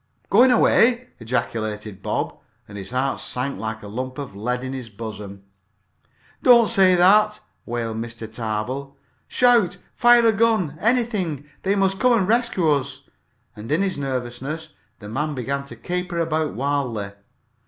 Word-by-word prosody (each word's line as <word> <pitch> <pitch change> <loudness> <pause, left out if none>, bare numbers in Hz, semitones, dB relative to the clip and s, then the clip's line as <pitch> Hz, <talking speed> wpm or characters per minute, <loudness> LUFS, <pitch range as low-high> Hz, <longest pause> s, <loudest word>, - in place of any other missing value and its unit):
"Going 260 +1 +6
away!" 245 0 +4
ejaculated 110 -3 -3
Bob, - - -2 0.3
and 100 - -12
his 100 -2 -7
heart 130 +2 -1
sank 125 -3 -3
like 110 +1 -5
a - - -8
lump 130 +4 -5
of 140 -8 -7
lead 125 +5 -2
in 130 0 -4
his 130 -4 -6
bosom. 100 -2 -8 1.0
"Don't 235 -3 +6
say 185 -2 +5
that!" 210 +4 +4 0.3
wailed 115 -2 -3
Mr. 115 0 -6
Tarbill. 120 +5 -4 0.3
"Shout 235 -8 +3 0.2
fire 240 -1 +5
a 225 - +5
gun 215 -8 +1
anything! 210 - 0
They 195 +1 +1
must 195 -1 +1
come 250 -1 +4
and 200 -6 +2
rescue 230 -6 +1
us!" 140 -2 0 0.5
And 110 +5 -8
in 160 +6 +2
his 190 -2 -1
nervousness 135 +4 -4 0.3
the 105 - -11
man 150 +7 -2
began 140 +2 -3
to 140 - -10
caper 180 0 -4
about 160 -2 -1
wildly. 125 -7 -2
140 Hz, 150 wpm, -22 LUFS, 115-195 Hz, 1.0 s, Going